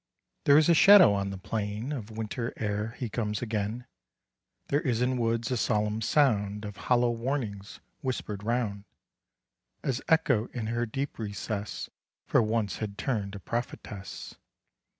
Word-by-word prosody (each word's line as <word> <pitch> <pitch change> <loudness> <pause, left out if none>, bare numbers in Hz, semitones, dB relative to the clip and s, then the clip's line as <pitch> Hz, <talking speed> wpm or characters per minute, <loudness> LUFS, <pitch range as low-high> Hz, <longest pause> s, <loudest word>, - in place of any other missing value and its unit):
There 140 0 +7
is 155 - +5
a 170 - +6
shadow 190 - +8
on 100 0 -1
the 100 - -5
plain 105 +5 -3
Of 120 -7 -5
Winter 110 +2 -4
ere 105 +1 -2
he 125 - -3
comes 105 -1 -2
again, 110 +1 -2 0.8
There 145 +2 +2
is 125 -8 0
in 125 +1 +1
woods 115 +1 0
a 125 - +1
solemn 105 0 0
sound 105 -6 +2
Of 105 -1 -6
hollow 120 +2 +2
warnings 115 -5 -3 0.2
whisper'd 110 -6 -3
round, 105 -3 -1 1.0
As 130 -1 -1
Echo 130 -8 +3
in 115 -3 -2
her 120 +2 -1
deep 135 +4 -4
recess 105 -1 -4 0.4
For - - +4
once 110 -3 0
had 105 -2 -5
turn'd 105 -7 -2
a - - -6
prophetess. 105 -2 -5
115 Hz, 150 wpm, -29 LUFS, 105-125 Hz, 1.0 s, shadow